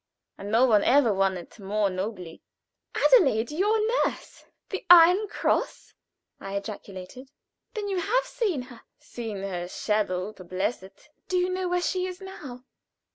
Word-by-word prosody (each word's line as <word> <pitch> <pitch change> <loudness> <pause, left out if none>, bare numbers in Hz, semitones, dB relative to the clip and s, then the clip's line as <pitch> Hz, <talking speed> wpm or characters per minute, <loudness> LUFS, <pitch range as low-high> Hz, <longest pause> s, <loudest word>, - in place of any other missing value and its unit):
And 200 - -8
no 230 +4 +4
one 215 -5 +4
ever 255 -4 +4
won 195 -1 +1
it 175 +6 -12
more 200 0 0
nobly." 185 -3 -5 0.5
"Adelaide 270 - +4
your 405 +8 +2 0.3
nurse - - -5 0.2
the 385 - -4
Iron 355 +4 +8
Cross?" - - -2 0.5
I 195 0 -6
ejaculated. 200 +4 -7 0.5
"Then 420 -2 -3
you 385 -2 -1
have 470 +8 +1
seen 370 - -2
her?" 245 -2 -14 0.2
"Seen 220 -5 -7
her 180 -3 -4
shadow 205 -1 -1
to 185 - -12
bless 185 +6 -2
it." 195 +9 -16 0.2
"Do 370 - 0
you 360 0 +1
know 370 0 -2
where 355 0 0
she 370 0 -1
is 365 -1 -7
now?" 290 -10 -9
235 Hz, 155 wpm, -26 LUFS, -, 0.5 s, Iron